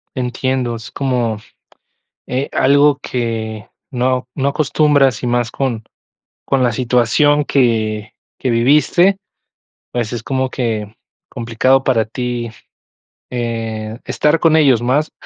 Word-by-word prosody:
Entiendo, 125 Hz, -1 st, -1 dB
es 115 Hz, -1 st, -9 dB
como, 125 Hz, -5 st, -1 dB, 0.9 s
eh, 130 Hz, +3 st, -2 dB
algo 145 Hz, +1 st, +4 dB
que 110 Hz, -3 st, -4 dB, 0.2 s
no 125 Hz, 0 st, 0 dB
no 140 Hz, 0 st, +1 dB
acostumbras 145 Hz, -4 st, +2 dB
y -, -, -1 dB
más 120 Hz, -1 st, 0 dB
con 120 Hz, -5 st, -2 dB, 0.6 s
con 135 Hz, -2 st, +1 dB
la 120 Hz, -, +2 dB
situación 125 Hz, +5 st, +2 dB
que 110 Hz, -6 st, 0 dB, 0.3 s
que 130 Hz, -, -1 dB
viviste, 150 Hz, +10 st, +3 dB, 0.7 s
pues 120 Hz, -1 st, -3 dB
es 120 Hz, -, -4 dB
como 130 Hz, +1 st, -1 dB
que 110 Hz, -4 st, -3 dB, 0.3 s
complicado 125 Hz, +2 st, +1 dB
para 120 Hz, -5 st, +2 dB
ti, 120 Hz, 0 st, -4 dB, 0.8 s
eh, 115 Hz, -2 st, -4 dB
estar 150 Hz, +2 st, +1 dB
con 160 Hz, -1 st, +4 dB
ellos 135 Hz, -7 st, +4 dB
más 140 Hz, +6 st, 0 dB
125 Hz, 120 wpm, -17 LUFS, 115-135 Hz, 0.9 s, algo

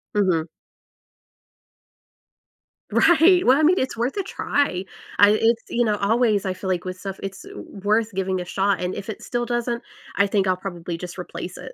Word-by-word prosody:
Mhm. 180 Hz, -5 st, +2 dB, 2.4 s
Right. 350 Hz, +2 st, +5 dB
Well, 260 Hz, +2 st, +6 dB
I 310 Hz, -, +2 dB
mean, 350 Hz, +4 st, +4 dB
it's 260 Hz, -3 st, -2 dB
worth 245 Hz, -, -1 dB
a 395 Hz, -, 0 dB
try. 195 Hz, -, -1 dB, 0.3 s
I 205 Hz, 0 st, +7 dB
it's 230 Hz, 0 st, +2 dB
you 240 Hz, 0 st, +1 dB
know, 210 Hz, -1 st, +1 dB
always, 215 Hz, 0 st, +2 dB
feel 185 Hz, -1 st, -2 dB
like 180 Hz, 0 st, -1 dB
with 185 Hz, 0 st, -5 dB
stuff, 195 Hz, -1 st, -6 dB
it's 195 Hz, -1 st, -6 dB
w -, -, -9 dB
w 195 Hz, -, -12 dB
worth 215 Hz, +2 st, +2 dB
giving 190 Hz, -1 st, -1 dB
a -, -, -6 dB
shot, 195 Hz, 0 st, 0 dB
and 180 Hz, +1 st, -2 dB
if 200 Hz, -, -7 dB
it 210 Hz, -, -6 dB
still 240 Hz, 0 st, -2 dB
doesn't, 240 Hz, 0 st, -2 dB, 0.3 s
I 200 Hz, -, +3 dB
think 195 Hz, -1 st, +1 dB
I'll 185 Hz, -1 st, +2 dB
probably 175 Hz, -3 st, -6 dB
just 180 Hz, +1 st, -8 dB
replace 180 Hz, 0 st, -7 dB
it. -, -, -9 dB
200 Hz, 190 wpm, -23 LUFS, 185-240 Hz, 2.4 s, I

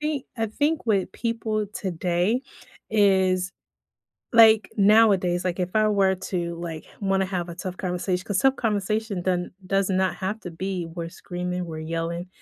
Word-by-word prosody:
think 300 Hz, -3 st, -2 dB
I 225 Hz, -1 st, 0 dB
think 290 Hz, +7 st, -1 dB
with 200 Hz, -4 st, +1 dB
people 225 Hz, -2 st, -2 dB
today 185 Hz, +6 st, 0 dB, 0.5 s
is 190 Hz, -3 st, +3 dB, 0.8 s
like, 220 Hz, -2 st, +6 dB
nowadays, 195 Hz, -4 st, +4 dB
like, 180 Hz, 0 st, -2 dB
if 180 Hz, +2 st, -2 dB
I 215 Hz, 0 st, +4 dB
were 195 Hz, -2 st, +3 dB
to, 180 Hz, -2 st, -3 dB
like, 165 Hz, -2 st, -5 dB
h -, -, -20 dB
wanna 195 Hz, -1 st, +1 dB
have 180 Hz, -2 st, -3 dB
a 170 Hz, -, -7 dB
tough 180 Hz, +1 st, -6 dB
conversatio 180 Hz, 0 st, -2 dB
'cause 200 Hz, -2 st, -1 dB
tough 270 Hz, +3 st, +3 dB
conversation 210 Hz, -3 st, -1 dB
doesn't 180 Hz, -1 st, 0 dB
does 195 Hz, +1 st, +1 dB
not 190 Hz, -1 st, +1 dB
have 200 Hz, +3 st, -3 dB
to 180 Hz, -, -7 dB
be, 185 Hz, +1 st, -3 dB
"we're 165 Hz, 0 st, -6 dB
screaming, 180 Hz, +1 st, -4 dB
we're 160 Hz, -1 st, -6 dB
yelling," 165 Hz, +2 st, -3 dB
190 Hz, 165 wpm, -25 LUFS, 180-215 Hz, 0.8 s, like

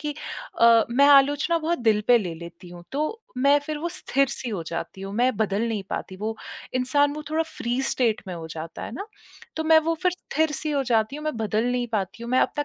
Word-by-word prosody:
कि 300 Hz, -1 st, -3 dB, 0.5 s
अ, 230 Hz, -1 st, +7 dB
मैं 275 Hz, +4 st, +5 dB
आलोचना 285 Hz, +4 st, +5 dB
बहुत 330 Hz, +2 st, -1 dB
दिल 220 Hz, -3 st, +3 dB
पे 245 Hz, -, +8 dB
ले 185 Hz, -6 st, -4 dB
लेती 170 Hz, +2 st, -11 dB
हूँ 175 Hz, 0 st, -11 dB
तो, 310 Hz, +11 st, -2 dB, 0.2 s
मैं 280 Hz, +2 st, +5 dB
फिर 300 Hz, +1 st, -5 dB
वो 335 Hz, +3 st, -2 dB
स्थिर 275 Hz, -4 st, 0 dB
सी 250 Hz, -, -4 dB
हो 200 Hz, -7 st, -3 dB
जाती 170 Hz, +3 st, -5 dB
हूँ, 195 Hz, +1 st, -6 dB
मैं 245 Hz, +1 st, +2 dB
बदल 210 Hz, 0 st, 0 dB
नहीं 215 Hz, -3 st, -2 dB
पाती, 190 Hz, -, -4 dB
वो 220 Hz, +3 st, -4 dB, 0.4 s
इंसान 285 Hz, +3 st, +3 dB
वो 305 Hz, -, -6 dB
थोड़ा 320 Hz, +1 st, +2 dB
फ़्री 255 Hz, -5 st, -3 dB
स्टेट 245 Hz, -4 st, +1 dB
में 180 Hz, -, -4 dB
हो 165 Hz, -1 st, -7 dB
जाता 160 Hz, +1 st, -7 dB
है -, -, -7 dB
ना। 400 Hz, -, -6 dB, 0.5 s
तो 320 Hz, -, -2 dB
मैं 320 Hz, 0 st, +7 dB
वो 330 Hz, -, +2 dB
फिर 365 Hz, -, +4 dB
स्थिर 315 Hz, -3 st, -1 dB
सी 305 Hz, +1 st, -2 dB
हो 285 Hz, -2 st, +1 dB
जाती 230 Hz, 0 st, +1 dB
हूँ, 300 Hz, -, -8 dB
मैं 305 Hz, -5 st, -2 dB
बदल 220 Hz, +1 st, 0 dB
नहीं 245 Hz, -1 st, -1 dB
पाती 210 Hz, +2 st, -2 dB
हूँ, 235 Hz, -, -6 dB
मैं 255 Hz, -, +4 dB
अपना 290 Hz, -, 0 dB
250 Hz, 235 wpm, -25 LUFS, 215-295 Hz, 0.5 s, पे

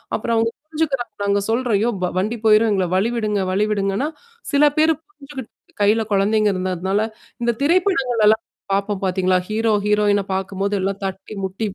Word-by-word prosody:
அப்புறம் 230 Hz, +1 st, -1 dB
அவுங்க 230 Hz, +1 st, +1 dB
புரிஞ்சுக்கிறாங்க 285 Hz, -8 st, -2 dB
நாங்க 200 Hz, 0 st, +2 dB
சொல்றோம். 235 Hz, -2 st, +1 dB
யோ! 240 Hz, -, +2 dB
வ -, -, +3 dB
வண்டி 220 Hz, +5 st, -1 dB
போயிரும் 215 Hz, 0 st, +5 dB
எங்கள 190 Hz, -2 st, +1 dB
வலிவிடுங்க, 215 Hz, -1 st, 0 dB
வழிவிடுங்கன்னா, 205 Hz, +5 st, 0 dB, 0.4 s
சில 285 Hz, +1 st, +4 dB
பேரு 320 Hz, +1 st, +4 dB
புரிஞ்சுகிட்டு 285 Hz, -, -10 dB, 0.3 s
கையில 215 Hz, +2 st, +4 dB
குழந்தைங்க 210 Hz, +2 st, +3 dB
இருந்ததுனால 185 Hz, +2 st, -1 dB, 0.4 s
இந்த 235 Hz, 0 st, +2 dB
திரைப்படங்கள் 290 Hz, -, +2 dB
எல்லாம் 220 Hz, +1 st, +4 dB, 0.3 s
பாார்ப்போம் 200 Hz, 0 st, -1 dB
பார்த்தீங்களா? 185 Hz, 0 st, +2 dB
ஹீரோ, 220 Hz, +1 st, +1 dB
ஹீரோயின 210 Hz, -1 st, +3 dB
பார்க்கும்போது 195 Hz, +1 st, -2 dB
எல்லாம் 195 Hz, +1 st, -2 dB
தட்டி, 195 Hz, +2 st, -6 dB
முட்டி 190 Hz, +4 st, -4 dB
215 Hz, 150 wpm, -20 LUFS, 195-240 Hz, 0.4 s, போயிரும்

